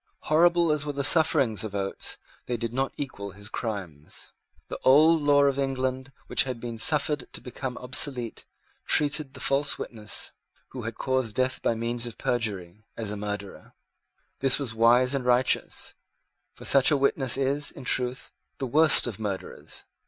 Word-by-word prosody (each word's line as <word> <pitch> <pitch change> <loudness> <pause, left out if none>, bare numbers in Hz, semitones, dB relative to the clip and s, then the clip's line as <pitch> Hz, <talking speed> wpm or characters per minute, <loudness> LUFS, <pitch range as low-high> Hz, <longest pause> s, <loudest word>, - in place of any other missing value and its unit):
Horrible 170 +1 +3
as 150 -1 0
were 145 -1 -4
the 140 0 -3
sufferings 145 - +3
of 105 -2 -6
Oates, 95 -1 -2 0.3
they 120 - -2
did 115 0 -4
not 135 +1 -1
equal 100 -9 -6
his 105 +1 -11
crimes. 95 - -7 0.4
The - - -7
old 155 +4 +5
law 145 -1 +4
of 140 -1 +1
England, 130 -1 -2
which - - +2
had 130 -3 -5
been 115 -1 -6
suffered 150 +1 +2
to - - -6
become 125 0 -6
obsolete, 125 -2 0 0.4
treated 145 -2 +1
the - - -9
false 140 +1 +1
witness, 105 -3 -4 0.4
who 130 - -7
had 115 0 -5
caused 130 -5 -1
death 130 0 -1
by 115 - 0
means 120 +1 -1
of 115 - -9
perjury, 105 -5 -3
as 110 -3 -3
a - - -4
murderer. 105 -1 -7 0.6
This 135 -1 +2
was 135 -6 -4
wise 120 +3 +4
and 135 -2 -1
righteous; 125 +1 0 0.6
for - - -12
such 135 -1 +5
a 150 - +3
witness 135 -2 +1
is, 140 +2 0
in 135 - -11
truth, 125 0 0 0.3
the 135 - -3
worst 155 +4 +5
of 115 -5 -5
murderers. 100 -3 -6
130 Hz, 165 wpm, -26 LUFS, 115-140 Hz, 0.6 s, old